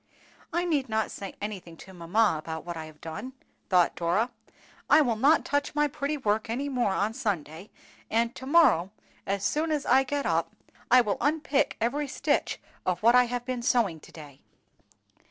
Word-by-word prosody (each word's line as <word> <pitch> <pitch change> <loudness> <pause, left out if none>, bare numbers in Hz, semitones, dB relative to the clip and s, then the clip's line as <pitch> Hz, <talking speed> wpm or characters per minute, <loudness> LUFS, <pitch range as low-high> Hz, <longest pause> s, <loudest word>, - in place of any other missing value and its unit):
"I 345 +1 0
need 290 -7 0
not 220 0 -1
say 195 -1 -7
anything 190 -5 -6
to 190 - -13
mamma 180 +2 +1
about 160 +1 -6
what 175 -1 -5
I 160 -1 -6
have 155 -1 -15
done," 205 +11 -7 0.4
thought 180 -2 +3
Dora. 185 +8 0 0.6
"I 295 - +7
will 240 -6 +1
not 285 +8 +3
touch 285 0 -1
my 295 0 +3
pretty 295 +1 -3
work 220 -3 -1
any 270 +5 -2
more 245 -6 0
on 205 +3 0
Sunday; 190 - -4 0.4
and 230 +1 +1
to 260 - -9
morrow, 270 - +4 0.4
as 200 0 -1
soon 315 +2 0
as 295 -2 -1
I 260 +2 +5
get 280 +2 -2
up, - - 0 0.3
I 250 0 +7
will 210 -4 -1
unpick 290 -1 +1
every 280 +6 -1
stitch 270 - -1 0.2
of 185 +2 -2
what 235 +2 +6
I 250 0 +6
have 245 0 -4
been 255 -1 -3
sewing 230 -9 +1
to - - -16
day. 145 -4 -13
230 Hz, 185 wpm, -27 LUFS, 185-275 Hz, 0.6 s, I